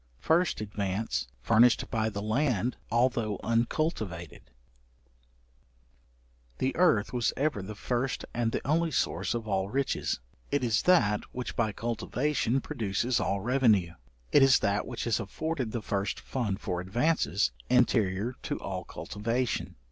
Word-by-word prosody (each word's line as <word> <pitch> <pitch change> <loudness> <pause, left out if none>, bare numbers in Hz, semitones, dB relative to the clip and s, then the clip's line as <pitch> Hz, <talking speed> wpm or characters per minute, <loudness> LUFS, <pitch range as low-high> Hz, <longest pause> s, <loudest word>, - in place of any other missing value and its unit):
First 165 - +1
advance 100 0 -2 0.2
furnished 115 - +4
by 110 -1 +1
the 100 -1 -5
land 120 0 +1 0.2
although 115 -3 +1
uncultivated. 115 - -1 2.2
The 130 - -1
earth 130 - +3
was 120 -3 +1
ever 140 -6 0
the 105 +3 -7
first 125 +4 -2
and 115 -1 0
the - - -3
only 165 +3 +2
source 135 - 0
of 115 -2 -4
all 95 -1 0
riches: 135 - -1 0.3
it 145 -2 0
is 110 -3 +2
that 105 - +4
which 125 0 -4
by 110 -2 +1
cultivation 120 +4 -1
produces 115 +2 -1
all 100 0 0
revenue; 110 -7 +3 0.4
it - - +6
is 135 -1 +7
that 100 -1 0
which 120 -2 -4
has 115 -1 +1
afforded 130 +3 -3
the 115 -2 -4
first 100 -1 -2
fund 110 -7 -2
for 90 -4 -2
advances, 120 - +1 0.2
anterior 115 -3 +2
to - - -3
all - - -4
cultivation. 115 +4 -3
115 Hz, 135 wpm, -29 LUFS, 105-130 Hz, 2.2 s, is